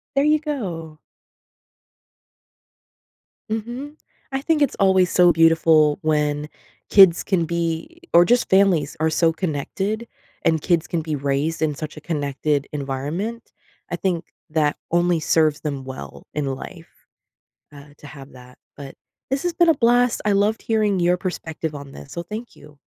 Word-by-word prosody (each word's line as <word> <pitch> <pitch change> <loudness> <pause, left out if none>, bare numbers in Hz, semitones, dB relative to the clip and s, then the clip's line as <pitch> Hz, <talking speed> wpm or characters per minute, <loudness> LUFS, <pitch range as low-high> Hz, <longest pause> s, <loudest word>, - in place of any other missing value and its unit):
There 275 - +3
you 305 0 +4
go. 180 - -5 2.5
Mhm, 240 +7 -5 0.3
I 270 - -2
think 305 +1 +1
it's 285 - +2
always 190 -2 +3
so 175 -1 +5
beautiful 160 -2 +4
when 150 -1 0 0.4
kids 190 -4 +7
can 180 -5 0
be 170 - -3
or 175 - +8
just 245 +3 +2
families 190 -7 +3
are 160 0 +2
so 165 +1 +2
connected 195 +8 -3 0.4
and 160 -2 +2
kids 170 -3 +1
can 170 - -2
be 155 -1 -3
raised 140 +3 -1
in 155 -2 +1
such 155 +1 -7
a - - -9
connected 145 -2 -1
environment, 150 - -4 0.4
I 175 - 0
think 175 -2 -2 0.3
that 150 -2 +1
only 175 0 +2
serves 155 -1 +2
them 140 -3 -4
well 100 - -9
in 150 -1 -2
life 165 +4 -10 0.9
uh, 145 0 -14
to 145 - -13
have 140 -1 -12
that, 125 0 -15 0.2
but 140 -2 -9 0.4
this 270 0 -1
has 350 - -1
been 340 0 +3
a 325 - +6
blast, 245 -1 +2
I 210 - +2
loved 205 +3 +1
hearing 210 -4 +1
your 175 +1 +3
perspective 160 -4 -5
on 140 -1 -9
this, 140 - -12
so 170 - -4
thank 215 +7 -8
you. 150 -1 -17
165 Hz, 155 wpm, -22 LUFS, 150-205 Hz, 2.5 s, or